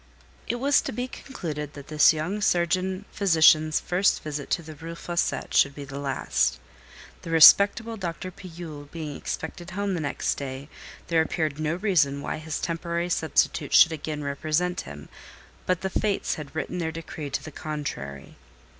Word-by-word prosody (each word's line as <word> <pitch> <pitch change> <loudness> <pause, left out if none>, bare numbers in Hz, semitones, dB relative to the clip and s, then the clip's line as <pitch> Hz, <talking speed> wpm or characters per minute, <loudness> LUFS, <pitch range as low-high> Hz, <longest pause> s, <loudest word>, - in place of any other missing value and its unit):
It - - -1
was 275 +3 +3
to - - -4
be 245 +3 -3
concluded 150 - -6
that 140 -1 -11
this 155 0 +6
young 165 +7 -3
surgeon 185 0 +1
physician's 160 -4 +4
first 185 +3 +1
visit 150 -2 -5
to 170 - 0
the 155 0 -9
Rue 165 +3 -8
Fossette 170 0 +1
would 140 -1 -11
be 145 - -7
the 135 +1 -7
last. 140 -1 0 0.6
The - - -8
respectable 200 +7 +7
Dr. 185 0 -5
Pillule 165 -6 -9
being 155 -3 -6
expected 175 +2 -5
home 200 +1 -2
the 175 - -1
next 145 -3 -1
day, 135 +1 -6 0.4
there 165 -1 +4
appeared 155 -2 -1
no 155 +1 0
reason 170 -8 +2
why - - -3
his 155 -1 -4
temporary 170 +1 -2
substitute 160 -2 +1
should 165 - +8
again 150 -1 -4
represent 155 +5 -1
him; 75 0 -10 0.6
but 185 -1 +1
the 190 - -1
Fates 205 0 0
had 150 0 -8
written 180 +3 -3
their 160 -2 -1
decree 160 -2 -7
to - - -3
the 155 - -8
contrary. 140 - -6
160 Hz, 165 wpm, -26 LUFS, 150-180 Hz, 0.6 s, should